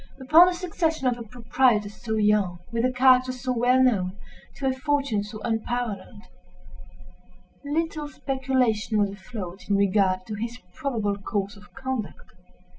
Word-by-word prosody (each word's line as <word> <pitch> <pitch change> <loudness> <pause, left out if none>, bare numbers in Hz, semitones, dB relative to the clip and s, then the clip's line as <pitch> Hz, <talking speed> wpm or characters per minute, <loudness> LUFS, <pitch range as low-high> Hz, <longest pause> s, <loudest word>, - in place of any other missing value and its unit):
Upon 310 +7 +7
the 365 - +1
succession 325 -5 -1
of 245 -1 +1
a - - -6
proprietor 230 -1 +1
so 220 +1 -5
young, 210 -4 +2
with 230 0 -1
a 255 - +2
character 255 0 +4
so 255 0 -4
well 250 +2 +4
known, 195 -6 +1 0.4
to 275 - -5
a 265 - +2
fortune 275 -5 0
so 210 +1 -8
unparalleled, 225 -2 -3 1.4
little 305 +1 -2
speculation 260 -6 0
was 205 -1 +2
afloat 195 -2 -8
in 200 - +3
regard 190 -2 +2
to 215 - -6
his 230 +3 -4 0.2
probable 220 -9 -2
course 200 0 -3
of 205 0 -17
conduct. 260 -5 -5
235 Hz, 145 wpm, -25 LUFS, 205-260 Hz, 1.4 s, Upon